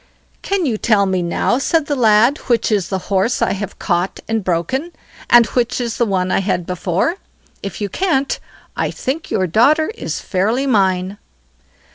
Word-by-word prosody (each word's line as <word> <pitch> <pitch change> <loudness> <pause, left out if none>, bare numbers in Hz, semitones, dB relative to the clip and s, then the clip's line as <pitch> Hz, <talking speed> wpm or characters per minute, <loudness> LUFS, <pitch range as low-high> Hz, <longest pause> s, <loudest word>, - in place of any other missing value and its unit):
"Can 390 -3 -1
you 225 -6 -1
tell 210 -3 +3
me 190 -1 0
now", 175 +8 0
said 320 +2 +1
the 290 - -1
lad, 235 +2 +4
"which 235 -3 +1
is 200 -5 +1
the 190 - -2 0.2
horse 195 +6 +2
I - - +1
have 200 -1 -5
caught 175 0 -1
and 225 -2 -1
broken, 255 - -2 0.4
and 240 -1 +7
which 245 0 -1
is 235 -2 -3
the 235 - +1
one 185 -2 0
I - - +2
had 190 -3 -1
before. 180 - -1 0.4
If 200 +1 -6
you 205 - 0
can't, 280 - 0 0.4
I - - -1
think 285 +5 -4
your 185 - +1
daughter 290 - +3
is - - -4
fairly 220 +8 0
mine." 190 -5 +1
220 Hz, 175 wpm, -18 LUFS, 190-265 Hz, 0.4 s, and